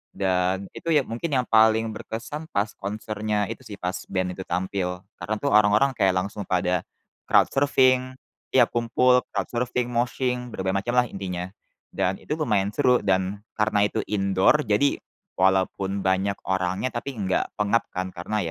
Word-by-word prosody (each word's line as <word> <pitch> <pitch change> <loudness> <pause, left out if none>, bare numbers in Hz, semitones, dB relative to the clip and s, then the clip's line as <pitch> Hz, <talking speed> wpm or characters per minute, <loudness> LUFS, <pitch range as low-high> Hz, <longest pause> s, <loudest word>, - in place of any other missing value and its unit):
Dan 95 0 0
itu - - -9
yang 145 -4 +3
mungkin 120 +9 -3
yang 125 - +2
paling 110 0 +4
berkesan 125 +8 -6
pas 100 +2 0
konsernya 105 0 -2
itu - - -7
sih, 105 - -7
pas 90 +1 -2
band 95 -1 -1
itu 95 - -7
tampil, 90 0 -2 0.2
karena 110 - -2
tuh 140 +3 -1
orang-orang 105 +6 +5
kayak 95 -5 +2
langsung 100 +2 -3
pada, 90 -1 +1 0.5
crowd - - +6
surfing, 130 -2 +3 0.3
tiap 125 -3 +5
kumpul 125 +2 +3
crowd - - -2
surfing, 125 0 -1
moshing, 125 0 -1
berbagai 95 0 -2
macam 120 +1 -2
lah 125 - +2
intinya. 90 -3 -5 0.5
Dan 95 +1 0
itu 150 - -3
lumayan 105 -10 0
seru 125 -3 +4
dan 95 +1 0 0.2
karena 105 -1 +2
itu - - -3
indoor, 100 +8 +3
jadi, 105 +7 +2 0.4
walaupun 95 +1 +1
banyak 95 +1 +1
orangnya, 95 +6 0
tapi 130 +2 -5
enggak 95 -2 0
pengap 105 +2 +1
kan 95 0 -2
karena 95 +5 -3
105 Hz, 160 wpm, -25 LUFS, 95-125 Hz, 0.5 s, crowd